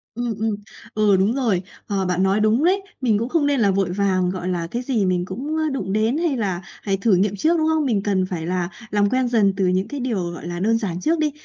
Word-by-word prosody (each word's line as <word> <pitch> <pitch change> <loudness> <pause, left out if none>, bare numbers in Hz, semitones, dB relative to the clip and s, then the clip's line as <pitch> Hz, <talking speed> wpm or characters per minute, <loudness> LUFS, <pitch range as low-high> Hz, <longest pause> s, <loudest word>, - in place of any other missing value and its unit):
Ừm, 240 -1 -2
ừm, 220 -1 0 0.4
ừ, 210 -2 +3
đúng 195 +4 +2
rồi. 225 -10 +1 0.3
Ờ, 195 -2 -1
bạn 180 0 +1
nói 195 +2 +2
đúng 215 +6 +3
đấy, 380 +4 +3 0.2
mình 230 -5 +2
cũng 230 +3 -2
không 325 -2 +1
nên 285 -2 +2
là 205 -4 +3
vội 190 -2 0
vàng, 185 -1 +1
gọi 185 -1 -4
là, 175 -2 -2
cái 240 - -2
gì 245 -6 0
mình 180 -1 0
cũng 300 +10 -2
đụng 195 -8 -3
đến 220 +6 +1
hay 325 -6 0
là 190 -5 -2 0.2
phải 195 -2 +1
thử 195 0 +3
nghiệm 200 +2 +1
trước, 320 - +2
đúng 315 -1 +1
không? 315 -1 +2
Mình 215 -7 +1
cần 195 -2 +1
phải 175 -3 -4
là 180 0 -1 0.2
làm 205 -1 +2
quen 255 +1 +1
dần 215 -5 +3
từ 190 -2 +2
những 185 +2 +1
cái 290 -1 -5
điều, 205 -9 -2
gọi 170 -1 -8
là, 175 0 -4
đơn 225 +4 +2
giản 185 -6 -3
trước 325 - +1
đi. 305 -1 +1
205 Hz, 260 wpm, -22 LUFS, 185-255 Hz, 0.4 s, ừ